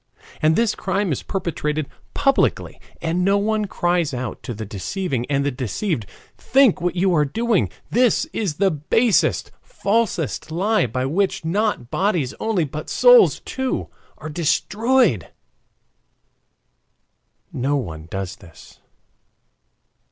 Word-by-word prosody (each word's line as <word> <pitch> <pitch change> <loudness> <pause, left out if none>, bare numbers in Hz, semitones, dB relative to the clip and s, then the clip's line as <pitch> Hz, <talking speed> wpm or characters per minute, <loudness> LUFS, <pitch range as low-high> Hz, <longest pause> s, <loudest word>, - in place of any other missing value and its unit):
And 155 +1 +4
this 230 +1 +2
crime 190 -1 -1
is 135 - -2
perpetrated 155 -6 -2 0.3
publicly 275 -1 +1 0.2
and 170 +2 0
no 195 +2 +3
one 215 +1 0
cries 175 -6 0
out 125 -2 -5
to 125 - -6
the 110 +1 -6
deceiving 125 - -3
and 140 -1 +1
the 145 - +1
deceived: 125 - -3 0.3
"Think 265 -8 +3
what 175 0 -1
you 185 +1 +2
are 150 -3 +4
doing; 225 +8 0 0.2
this 245 +4 +3
is 195 -9 -2
the 195 +3 +2
basest, 190 - +1
falsest 200 - -1
lie, 195 - +1
by 130 +3 -2
which 180 +4 0
not 190 - -1
bodies 175 -9 0
only, 220 -6 0
but 150 +1 -6
souls - - +6
too, 265 -1 -3 0.3
are 155 - -8
destroyed." 190 - +1 2.2
No 135 +4 0
one 80 - -5
does 95 0 -5
this. 85 -4 -16
175 Hz, 125 wpm, -21 LUFS, 140-210 Hz, 2.2 s, souls